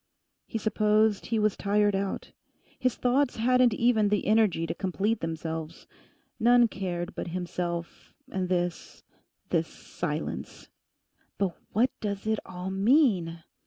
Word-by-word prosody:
He - - -3
supposed 215 -1 +2
he 225 - 0
was 215 -2 +2
tired 205 0 +2
out. 195 0 -3 0.5
His 255 -2 +1
thoughts 250 +2 +1
hadn't 250 0 +3
even 225 -3 +3
the 210 0 +1
energy 210 -6 +3
to - - -2
complete 200 +4 -1
themselves. 160 0 -5 0.5
None 240 +1 +6
cared 180 -2 -4
but - - -5
himself 175 -1 -4 0.2
and 185 -1 -2
this—this 175 -1 -3
Silence. - - -5 0.7
'But 190 -4 0 0.2
what 245 +5 +3
does 200 -1 -3
it 220 0 +1
all 180 +1 -5
mean? 195 - +2
205 Hz, 125 wpm, -28 LUFS, 180-225 Hz, 0.7 s, None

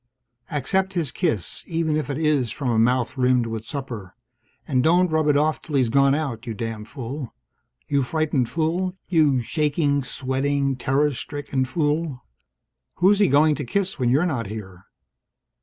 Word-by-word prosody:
Accept 190 +7 0
his 160 -7 0
kiss, 105 -6 -2
even 160 -2 0
if 155 -1 -2
it 140 - -2
is 150 -6 +1
from 130 +2 -2
a 110 - +2
mouth 125 +3 +1
rimmed 125 -1 +3
with 115 -1 -4
supper. 120 -9 -6 0.5
And 130 -1 +2
don't 175 +2 +4
rub 155 -1 +2
it 145 -1 +4
off 155 +1 +1
till 150 - -5
he's 130 -4 +3
gone 140 +2 +4
out, 135 -6 -3
you 115 - -3
damned 110 0 -5
fool. 135 -1 -6 0.5
You 140 -1 +2
frightened 140 -3 0
fool. 175 +3 -1
You 150 -8 +3
shaking, 145 0 +1
sweating, 135 +1 -1
terror 140 +3 +1
stricken 135 0 -3
fool. 150 -2 -1 0.7
Who's 195 +3 +4
he 205 - +5
going 150 +2 +4
to - - -4
kiss 190 +6 -2
when 125 -2 +2
you're 145 +8 +3
not 130 - -2
here? 95 -3 -8
140 Hz, 165 wpm, -23 LUFS, 125-155 Hz, 0.7 s, he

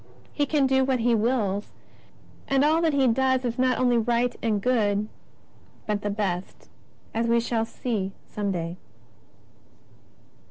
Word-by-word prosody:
He 290 -1 0
can 290 -1 +2
do 265 0 +3
what 260 -2 0
He 240 +1 +3
wills, 215 -3 0 0.7
and 275 +1 +3
all 315 +2 +3
that 325 -3 +2
He 270 -2 +3
does 260 +2 +2
is 235 0 -3
not 255 -1 +2
only 245 -2 +3
right 240 +2 +1
and 215 -3 +1
good, 210 -3 +1 0.8
but 210 -1 -1
the 205 - -2
best, 195 -3 -4 0.4
as 230 +1 0
we 235 0 +3
shall 230 -1 -1
see 220 -4 -3
some 205 -1 -3
day. 170 -1 -4
235 Hz, 150 wpm, -25 LUFS, 210-260 Hz, 0.8 s, do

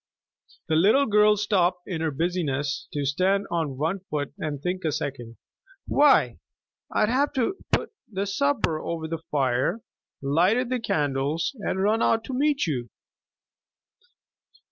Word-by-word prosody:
The 160 - +1
little 215 - +5
girl 210 -1 +4
stopped 185 -4 +1
in 170 -4 -3
her 160 - +1
busy 175 +5 -1
ness 140 0 -2
to 145 -1 -2
stand 185 +8 +1
on 160 -6 -1
one 165 +7 -1
foot 145 -2 -3
and 150 -2 -3
think 180 +5 -3
a 155 - 0
second. 125 -5 -5 0.5
"Why, 290 0 +4 0.5
I'd 215 - +2
have 280 +4 +1 0.4
put - - 0 0.2
the 195 0 -2
supper 205 - 0
over 160 -1 -4
the 165 0 -4
fire, 130 - 0 0.4
lighted 180 - +2
the 255 - +1
candles, 145 - -1
and 190 -2 -1
run 220 +3 +2
out 225 0 +2
to 260 - -6
meet 285 +2 +1
you." 125 -7 -3
175 Hz, 145 wpm, -25 LUFS, 145-210 Hz, 0.5 s, little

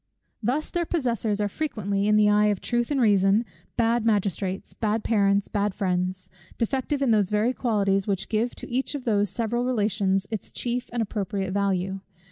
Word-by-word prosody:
Thus 255 +8 -1
their 345 -1 -1
possessors 235 - 0
are 205 - +1
frequently, 205 -6 -2
in 210 - +4
the 210 0 +5
eye 210 0 +4
of 205 -3 +1
truth 240 -1 -1
and 285 -2 0
reason, 205 -1 +4 0.3
bad 235 0 +2
magistrates, 200 -3 -1
bad 215 0 -1
parents, 200 -2 +2
bad 205 -2 -1
friends; 185 -1 -1 0.3
defective 270 +4 -1
in 255 - +3
those 205 -4 +3
very 210 +4 +1
qualities, 200 -5 +1
which 195 -2 -1
give 230 +3 -1
to - - -7
each 260 +4 -2
of 275 - -6
those 205 -3 +2
several 235 +4 -1
relations 205 -5 +1
its 215 -4 -5
chief 245 0 -3
and 235 -1 0
appropriate 200 -2 -3
value. 195 -1 0
210 Hz, 175 wpm, -25 LUFS, 195-240 Hz, 0.3 s, the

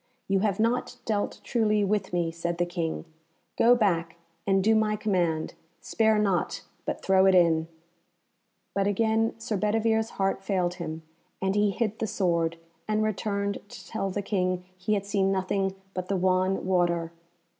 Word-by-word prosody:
"You 195 0 +2
have 200 -1 0
not 245 +2 0
dealt 210 -2 -1
truly 215 -3 +2
with 200 -1 0
me," 170 -2 0
said 170 +1 -3
the 175 - +1
King. 170 -2 -3 0.5
"Go 240 +1 +6
back, 170 -8 +1 0.3
and 195 -1 +3
do 220 +2 +4
my 215 -1 +2
command; 175 -7 0 0.3
spare 220 -1 +2
not, 200 -4 0 0.2
but - - -3
throw 190 0 +5
it 190 - +5
in." 165 -2 +4 1.1
But 200 0 +1
again 220 +2 +1
Sir 225 -2 -3
Bedivere's 220 +2 +1
heart 195 0 0
failed 180 -3 0
him, 160 -1 -5 0.4
and 190 0 0
he 205 0 +3
hid 215 +2 -2
the 220 - -1
sword, 170 -5 0 0.3
and 215 0 +1
returned 200 -1 -1
to - - -11
tell 195 -3 -2
the 200 +2 -3
King 185 -3 -1
he 185 +4 0
had 200 -1 -2
seen 200 -1 +1
nothing 190 0 0 0.2
but 185 -1 -4
the 195 - 0
wan 185 +1 +1
water. 175 -3 +1
195 Hz, 165 wpm, -27 LUFS, 180-215 Hz, 1.1 s, Go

